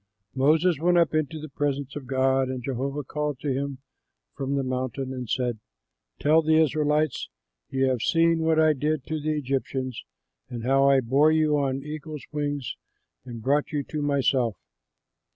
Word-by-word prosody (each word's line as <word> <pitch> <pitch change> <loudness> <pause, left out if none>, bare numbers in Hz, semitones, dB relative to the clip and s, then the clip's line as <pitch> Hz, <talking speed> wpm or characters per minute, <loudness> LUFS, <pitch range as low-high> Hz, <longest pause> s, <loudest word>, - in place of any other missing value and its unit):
Moses 155 +4 +3
went 175 +2 +3
up 170 -2 +3
into 155 0 -1
the 155 - -7
presence 140 -1 -2
of 140 -3 -7
God, 130 0 +2
and 130 -1 -4
Jehovah 135 +3 -3
called 150 -1 -3
to 140 -3 -1
him 140 0 -3 0.6
from 140 0 -2
the 140 - 0
mountain 130 +1 -3
and 125 -3 -6
said, 125 -4 -1 0.6
"Tell 155 +2 +4
the 160 0 +3
Israelites: 155 -2 +1 0.4
'You 135 0 +1
have 130 -3 0
seen 165 +2 +3
what 160 0 +2
I 155 -1 +5
did 150 0 -1
to 155 0 -3
the 155 +1 -1
Egyptians 130 -2 -3 0.5
and 120 -2 -6
how 135 +2 +4
I 135 -1 +5
bore 140 +6 +4
you 155 -1 +3
on 135 -1 -1
eagles' 150 0 -7
wings 145 -3 -3 0.5
and 120 -3 -8
brought 145 +3 +1
you 145 -2 -1
to 150 +2 -5
myself. 135 -6 +1
140 Hz, 170 wpm, -26 LUFS, 130-155 Hz, 0.6 s, I